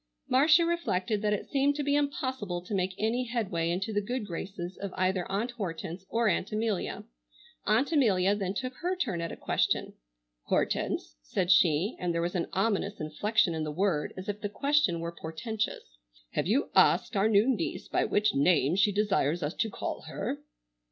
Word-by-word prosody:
Marcia 305 +6 +5
reflected 220 - 0
that 210 -1 +1
it 210 - -1
seemed 280 0 +1
to 295 - -2
be 285 0 +2
impossible 260 -10 -1
to 180 +4 -8
make 185 -1 0
any 230 +4 0
headway 195 -9 -1
into 190 +5 -2
the 205 - +1
good 240 +2 -3
graces 180 0 -6
of 200 -1 -5
either 185 0 0
Aunt 220 +5 -1
Hortense 190 -4 -5
or 230 0 +1
Aunt 190 +1 0
Amelia. 215 -3 -2 0.6
Aunt 225 +9 +3
Amelia 200 - +3
then 195 -2 -2
took 255 +4 -3
her 360 +2 -1
turn 215 - -2
at 170 - -3
a - - -6
question. - - 0 0.5
"Hortense," - - -1
said 175 - 0
she, 180 +2 +4
and 175 -1 -1
there 170 - +1
was 175 - -2
an 175 -2 -1
ominous 200 0 0
inflection 170 +5 +1
in 160 -1 -2
the 155 - -3
word 170 -2 0
as 185 +2 -7
if 205 0 -4
the 205 - -2
question 275 - +1
were 170 0 -3
portentous, 165 - -5 0.3
"have - - -1
you 245 +9 +1
asked - - +4
our 200 +2 +3
new 210 +2 +4
niece 260 -4 -1
by - - +1
what 210 +1 +2
name 155 +1 +3
she 200 +2 +4
desires 190 -6 +1
us 145 +3 -2
to 225 - -1
call - - -4
her?" - - -3
200 Hz, 185 wpm, -29 LUFS, 175-230 Hz, 0.6 s, Marcia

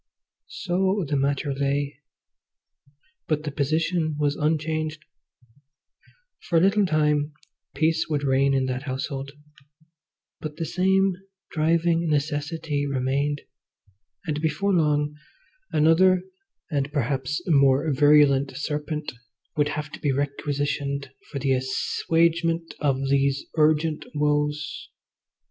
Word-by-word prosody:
So 190 +1 0
the 145 - -1
matter 140 +1 0
lay. 140 0 -1 1.3
But 155 -3 0
the 150 - -3
position 155 +3 0
was 145 -1 +1
unchanged. 155 0 -1 1.3
For 170 - 0
a - - +7
little 195 +3 +3
time 150 -2 +1 0.4
peace 160 0 +1
would 145 -2 -1
reign 135 0 +3
in 135 -1 +1
that 130 0 -2
household, 135 +1 -4 1.1
but 155 -1 -6
the 165 - -3
same 190 +2 +2 0.3
driving 165 +1 +1
necessity 150 0 -1
remained, 140 +2 -1 0.8
and 150 -2 -2
before 165 +6 0
long 150 -3 +1 0.5
another, 180 +4 +4 0.5
and 140 -1 -1
perhaps 135 0 -1
more 140 -1 +3
virulent, 145 -1 +4
serpent 150 +1 -3 0.4
would 145 -1 +2
have 150 -1 -4
to - - -9
be 145 - 0
requisitioned 140 0 -2 0.2
for 145 - -4
the 135 0 0
assuagement 165 +6 0
of 135 -3 +1
those 140 0 +1
urgent 155 0 +2
woes. 150 0 -1
150 Hz, 110 wpm, -25 LUFS, 140-160 Hz, 1.3 s, a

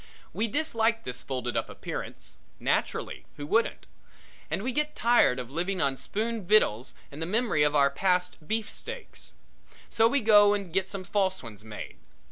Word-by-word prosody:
We 225 - 0
dislike 230 -4 0
this 125 -1 -4
folded 125 -4 -3
up - - -1
appearance - - -7 0.3
naturally - - -1
who 145 - -5
wouldn't? 225 +10 +1 0.6
And 195 - -2
we 255 - -1
get 300 +4 -1
tired 235 - +4
of 125 0 -6
living 180 +5 -1
on 140 -1 +1
spoon 220 - -3
victuals 155 - +3 0.2
and 145 +3 -9
the 165 - -2
memory 215 -5 +1
of 150 0 +3 0.2
past 180 +2 +1
beef 220 0 -1
steaks. - - -8 0.6
So 225 0 +4
we 280 +3 +1
go 205 -2 +6
and 195 -5 -5
get 190 0 +1
some 195 -2 -5
false 190 -2 0
ones 105 -4 -10
made. 110 -1 -8
195 Hz, 165 wpm, -28 LUFS, 145-225 Hz, 0.6 s, go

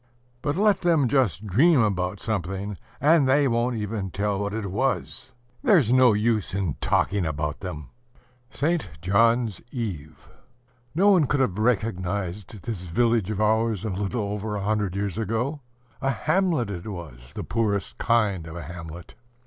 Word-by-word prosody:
But 145 -1 -1
let 205 +2 +3
them 165 -6 +3
just 115 - +1
dream 135 - +4
about 100 -3 0
something, 100 -1 -3 0.2
and 150 -2 +4
they 140 +1 +4
won't 120 0 +1
even 105 -2 -3
tell 100 +2 -1
what 100 0 -2
it 105 -4 -3
was! 125 +2 -2 0.3
There's 150 - +4
no 130 -3 +6
use 105 -2 0
in 95 -7 -1
talking 100 -2 +1
about 75 -2 -2
them! 85 -6 -7 0.6
ST. 155 - -1
JOHN'S 115 +3 +2
EVE. 80 - -6 0.7
No 200 +5 +5
one 170 -8 +4
could 145 - +1
have 110 -7 0
recognized 100 -3 -1
this 110 -7 -4
village 110 +3 +1
of 105 -2 -2
ours 110 -1 +1
a 110 - -1
little 100 +4 -2
over 105 +1 -3
a 100 - -3
hundred 105 -3 0
years 100 -1 -2
ago: 115 +7 -2 0.4
a 135 - +1
hamlet 155 - +1
it 90 +1 -6
was, 75 - -9
the - - -4
poorest 105 -1 -1
kind 105 -8 +1
of 80 - -8
a 85 - -6
hamlet. 85 +1 -9
105 Hz, 155 wpm, -25 LUFS, 95-120 Hz, 0.7 s, no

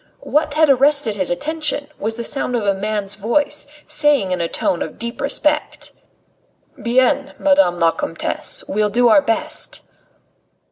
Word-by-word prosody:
What 300 0 0
had 315 0 +4
arrested 275 -4 +3
his 190 -3 -2
attention 295 - -2
was 220 +2 -2
the 235 - -5
sound 250 0 -2
of 225 -3 -1
a 200 - +3
man's 205 0 -3
voice, 235 +8 -1 0.2
saying 295 -10 +3
in 180 -1 -1
a 170 - 0
tone 170 - -1
of 155 - -5
deep 235 +1 -5
respect: 300 +2 -1 0.9
"Bien, 260 +4 +1
Madame 285 -12 +3
la 165 -1 +3
Comtesse, - - -4
we'll 210 0 0
do 240 +3 +3
our 290 - +6
best." 305 +5 -3
245 Hz, 150 wpm, -19 LUFS, 205-295 Hz, 0.9 s, our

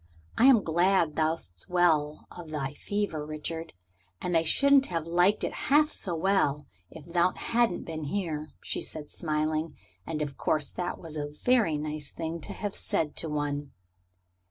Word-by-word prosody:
I 240 - +4
am 260 -6 +7
glad 170 -1 +2
thou'st 155 - -2
well 160 -4 +2
of 175 -3 -9
thy 145 -2 -3
fever, 200 -3 -2
Richard. 155 +2 -5 0.5
I 175 -2 +2
shouldn't 275 - +4
have 165 -3 -2
liked 175 +5 +3
it - - -1 0.2
half 300 +2 +5
so 175 -3 -1
well 160 -5 +1 0.2
if 160 - -11
thou 170 +1 +2
hadn't 230 -6 +1
been 160 -2 -5
here," 155 -3 -3
she - - -3
said, 150 -2 -6
smiling. 155 0 -1 0.3
And 155 -2 -1
of 140 -2 -7
course 155 -3 +1
that 180 0 -3
was 160 -2 -7
a 145 -1 -2 0.2
very 230 -11 +3
nice 150 -1 -5
thing 165 0 -4
to - - -6
have 205 -2 -4
said 150 -2 -1
to 160 - -2
one. 145 -1 -2
160 Hz, 160 wpm, -29 LUFS, 150-180 Hz, 0.5 s, am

